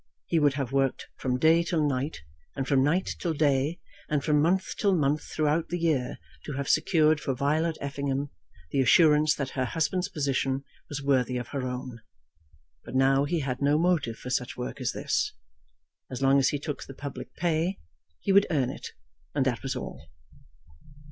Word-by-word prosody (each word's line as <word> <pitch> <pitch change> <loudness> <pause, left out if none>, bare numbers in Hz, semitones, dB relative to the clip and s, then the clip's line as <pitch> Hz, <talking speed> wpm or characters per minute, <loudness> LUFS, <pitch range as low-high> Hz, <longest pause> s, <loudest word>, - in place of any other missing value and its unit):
He 165 - +1
would 145 -3 +3
have 135 -3 -3
worked 135 -1 0
from 125 -1 0
day 160 +4 +5
till 165 -3 +1
night, 140 +2 -2 0.3
and 135 -1 -3
from 135 -2 +3
night 165 +7 +1
till 165 -3 -1
day, 145 +2 +1 0.3
and 150 -2 0
from 150 -2 +3
month 185 +4 +1
till 200 -3 +2
month 150 -1 +1
throughout 155 +1 0
the 175 - -1
year 150 -7 0 0.3
to 150 - -5
have 140 0 -3
secured 155 -1 +3
for 135 -3 -2
Violet 155 +5 0
Effingham 140 0 -2 0.4
the 135 - +2
assurance 150 +2 +5
that 135 -2 -3
her 130 -1 -1
husband's 165 +6 -1
position 135 -2 -1 0.3
was 145 -1 -5
worthy 130 -3 +2
of 120 -2 -5
her 135 -3 -3
own. 125 -1 -5 0.8
But - - -8
now 135 +1 +4
he 165 +2 -1
had 130 -1 -3
no 145 +1 +3
motive 160 -9 +1
for 125 - -7
such 125 0 -1
work 125 - -5
as - - 0
this. - - -1 0.8
As 130 - -5
long 135 +1 +5
as 135 - +3
he 145 - -1
took 145 0 -5
the 135 - -10
public 145 0 -7
pay, 170 +2 0 0.4
he - - 0
would 200 +1 +6
earn 135 -6 +1
it; - - -8 0.4
and - - +2
that - - 0
was - - -3
all. - - -7
145 Hz, 185 wpm, -27 LUFS, 135-160 Hz, 0.8 s, would